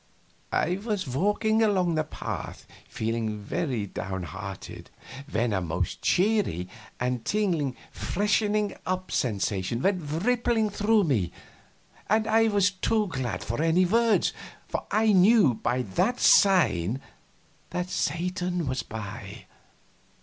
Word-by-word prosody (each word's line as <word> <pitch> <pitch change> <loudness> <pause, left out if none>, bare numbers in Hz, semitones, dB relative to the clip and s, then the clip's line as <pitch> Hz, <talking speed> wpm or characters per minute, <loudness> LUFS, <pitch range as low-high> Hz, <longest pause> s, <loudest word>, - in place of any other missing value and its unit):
I 175 +4 +1
was 210 -7 -2
walking 210 - +1
along 190 -6 +2
the 155 -1 +1
path, 155 - -6 0.2
feeling 110 -1 -2
very 120 +1 -2
downhearted, 95 0 -6 0.4
when 115 -2 0
a 95 - 0
most 85 +1 -3
cheery 185 - +1 0.3
and 125 -1 -1
tingling 170 - 0 0.2
freshening 210 +1 0
up 185 0 -2
sensation 105 -1 -1
went 190 -2 +2 0.2
rippling 240 -3 +2
through 210 +1 +3
me, 110 - 0 0.8
and 220 0 +3
I 225 +1 +4
was 205 -2 +3
too 210 +2 0
glad 130 -6 -3
for 115 +6 -3
any 165 +3 +3
words, 230 +3 +2 0.3
for - - -4
I 215 0 +3
knew 195 - +6
by 120 +3 -1
that 115 - 0
sign 130 - +4 0.7
that 180 +1 -3
Satan 180 +2 -1
was 130 -1 -1
by. 110 -2 -8
175 Hz, 120 wpm, -27 LUFS, -, 0.8 s, knew